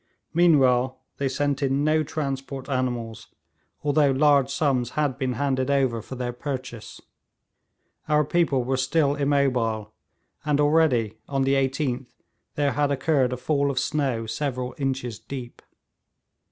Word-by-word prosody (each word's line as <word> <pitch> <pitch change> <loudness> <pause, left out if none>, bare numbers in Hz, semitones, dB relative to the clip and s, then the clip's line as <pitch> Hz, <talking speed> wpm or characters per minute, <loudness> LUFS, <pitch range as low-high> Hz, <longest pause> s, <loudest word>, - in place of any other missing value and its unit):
Meanwhile 130 -7 +3 0.2
they 140 -1 0
sent 140 +1 -1
in 135 +1 +1
no 155 +1 +3
transport 135 -3 -4
animals, 120 -5 -3 0.6
although 145 0 +3
large 140 -1 +4
sums 135 -4 0
had 145 -3 0
been 130 -2 -1
handed 130 +1 -1
over 130 -5 +1
for 130 - -8
their 125 -1 -3
purchase. 125 -4 -6 1.1
Our 150 0 +3
people 145 -5 +1
were 130 +2 -1
still 140 +2 +2
immobile, 130 -7 0 0.5
and 145 0 +1
already, 145 -8 +2
on 135 -1 0
the 135 +1 +2
18th, 135 -1 0 0.5
there 145 -1 +1
had 145 0 +1
occurred 135 -2 +1
a 125 - -2
fall 140 +2 0
of 135 - -3
snow 135 -4 0
several 125 0 -3
inches 130 -5 -2
deep. 120 +1 -8
135 Hz, 135 wpm, -25 LUFS, 125-145 Hz, 1.1 s, large